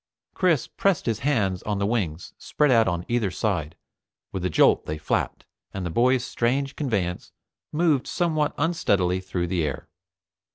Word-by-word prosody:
Chris 170 -8 +2
pressed 195 -5 0
his 115 -2 -1
hands 105 -10 0
on 105 -1 -2
the 100 - 0
wings 95 -7 -2
spread 150 -2 +1
out 115 -3 +5
on 85 -1 -1
either 120 -4 +1
side, 90 -6 -2 0.6
with 95 - -4
a 90 - +1
jolt - - +4
they 75 - -3
flapped, 75 - -2 0.3
and 95 -2 -3
the 85 - -3
boy's 125 +5 +2
strange 135 +4 -1
conveyance 100 - -2 0.4
moved 150 -4 +2
somewhat 155 -4 0
unsteadily 100 - +1
through 90 -1 -3
the 85 -1 -1
air. 75 -3 -4
105 Hz, 160 wpm, -25 LUFS, 90-140 Hz, 0.6 s, out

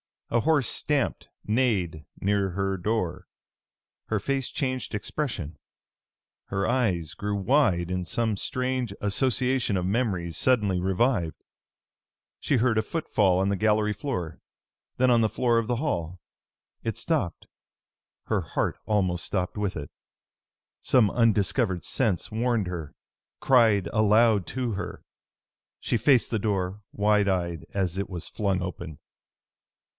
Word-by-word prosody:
A 120 - +3
horse 145 -1 +2
stamped, 145 -3 -1 0.2
neighed 100 -10 0 0.2
near 100 -1 +1
her 95 +1 -1
door. 95 -2 -2 0.8
Her 110 - -1
face 135 +4 -1
changed 130 -5 -2
expression. 105 - -3 0.9
Her 95 0 -2
eyes 95 - 0
grew 105 0 -3
wide 100 - +2
in 90 -1 -2
some 110 +2 0
strange 130 -1 -2
association 125 +2 +1
of 90 -1 0
memories 95 -6 -1
suddenly 105 -8 +3
revived. 95 - 0 1.0
She 140 - +1
heard 120 -1 +2
a - - +3
footfall 105 - +1
on 95 +1 +1
the 100 - 0
gallery 105 +1 +2
floor, 95 - -4 0.6
then 130 0 +4
on 120 - +5
the 110 - +2
floor 115 +2 +2
of 115 - -3
the 120 - +1
hall. 90 - -2 0.6
It - - -3
stopped. - - -1 0.8
Her - - 0
heart - - -2
almost 95 -5 0
stopped 95 +1 -2
with 100 -2 -1
it. 75 -2 -6 0.9
Some 115 -6 +4
undiscovered 110 -4 +2
sense 110 -8 0
warned 115 -2 0
her, 85 -5 -6 0.4
cried 115 - +4
aloud 110 -1 +4
to 125 -2 -2
her. 100 - -5 0.8
She - - 0
faced 130 -1 +3
the 110 - +1
door, 100 -1 -1
wide 105 0 +2
eyed, 85 -3 -1
as 95 -2 -1
it 100 - -3
was 90 -3 -6
flung 100 -4 -1
open. 85 -4 -6
105 Hz, 130 wpm, -26 LUFS, 90-120 Hz, 1.0 s, on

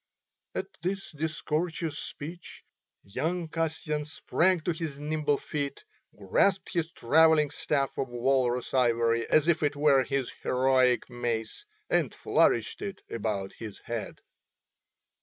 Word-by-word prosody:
At - - -1 0.2
this 195 +2 -3
discourteous 160 +1 -2
speech 165 +4 -8 0.4
young 165 - -2
Kasyan 155 -2 -2
sprang 175 +4 +1
to 175 - 0
his 160 -4 -4
nimble 150 -1 0
feet, 145 - -4 0.3
grasped 190 -1 +1
his 170 -2 -1
travelling 155 +3 +4
staff 140 -2 -1
of 135 - 0
walrus 125 0 +1
ivory 115 -2 +2
as 155 +1 +4
if 170 -2 +3
it 145 -1 +1
were 145 -2 +4
his 135 -2 -2
heroic 130 -1 +3
mace 120 - -3 0.2
and - - +1
flourished - - +2
it 195 -1 -6
about 105 -4 -2
his 110 -3 -7
head. 115 -2 -5
145 Hz, 120 wpm, -29 LUFS, 125-160 Hz, 0.4 s, travelling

